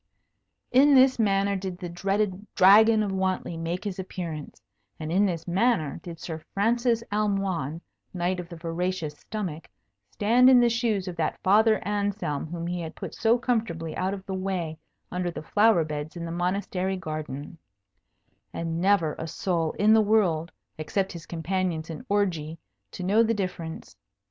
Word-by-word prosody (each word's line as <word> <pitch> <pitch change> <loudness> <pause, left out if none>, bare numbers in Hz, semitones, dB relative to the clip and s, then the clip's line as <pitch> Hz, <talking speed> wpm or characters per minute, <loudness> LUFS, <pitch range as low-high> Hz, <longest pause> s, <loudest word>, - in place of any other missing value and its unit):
In 275 +3 +6
this 260 -1 +5
manner 200 -2 +2
did 190 -2 -4
the 180 -1 -6
dreaded 195 +3 -1
Dragon 215 +3 +7
of 200 - -2
Wantley 190 -2 -1
make 165 +3 -3
his 195 -3 -4
appearance, 170 -5 -6 0.4
and 155 0 -4
in 200 +4 +3
this 170 -3 -4
manner 180 - +1
did 170 -2 -9
Sir 160 -2 -5 0.2
Francis 230 +3 +2
Almoign, 195 -7 -1 0.3
Knight 180 0 -1
of 175 -1 -7
the 170 - -8
Voracious 165 -1 -3
Stomach, 180 -8 -5 0.4
stand 240 +5 +4
in 255 -1 +7
the 240 -1 +4
shoes 225 -5 0
of 180 - -4
that 160 -2 -1
Father 215 +3 +5
Anselm 205 -8 -1
whom 170 +1 -5
he 175 0 -3
had 160 0 -7
put - - -7
so 230 +1 +3
comfortably 220 -10 -2
out 190 +2 -1
of 190 -1 -11
the 190 - -4
way 185 -4 -3 0.3
under 180 -1 -1
the 170 - -7
flower 205 0 +4
beds 150 +1 -5
in 170 -1 -5
the 165 - -5
Monastery 185 +2 -1
garden, 155 -2 -6 0.9
and 165 0 -3
never 185 -5 +3
a 160 - -4
soul 165 -1 -1
in 215 +2 +4
the 220 - +6
world 185 -6 +2 0.3
except 190 +5 -1
his 170 -1 -9
companions 170 -1 -2
in 155 - -7
orgy 170 -6 0 0.3
to 185 - -7
know 205 +5 +4
the 230 0 +2
difference. 180 -5 -5
185 Hz, 165 wpm, -26 LUFS, 165-205 Hz, 0.9 s, Dragon